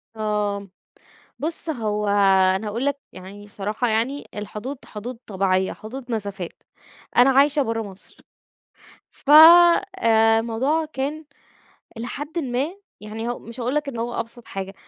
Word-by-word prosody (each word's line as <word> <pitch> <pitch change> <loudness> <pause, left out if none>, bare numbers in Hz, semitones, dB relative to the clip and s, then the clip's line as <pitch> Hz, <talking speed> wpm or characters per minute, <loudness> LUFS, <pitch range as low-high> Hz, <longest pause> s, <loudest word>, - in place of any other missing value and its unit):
آه، 210 -2 -2 0.7
بُص 325 +2 -4
هو 210 -7 -2 0.5
أنا 210 +3 -3
هاقول 230 +6 -3
لَك 285 0 -1
يعني، 200 +3 -11
صراحة 210 +4 -3
يعني، 235 +6 -1
الحدود 210 +6 -6
حدود 230 +4 -7
طبيعية، 190 -1 0
حدود 245 +3 -9
مسافات. 200 -5 -5 0.5
أنا 245 +2 +7
عايشة 285 +2 +4
برّه 225 -2 -1
مصر. 200 -3 -10 0.9
ف 285 - -6
آآ، 300 -9 +7
الموضوع 260 +8 0
كان- 290 +4 -3 0.7
إلى 230 +1 -5
حدٍّ 290 +7 -5
ما- 265 -1 -1 0.3
يعني 220 +2 -6
هو 240 - -3
مش 235 +2 -11
هاقول 245 +3 -1
لَك 300 -1 -1
إن 245 -4 -5
هو 235 +1 -3
أبسط 230 +1 -9
حاجة، 195 0 -6
230 Hz, 135 wpm, -23 LUFS, 210-275 Hz, 0.9 s, أنا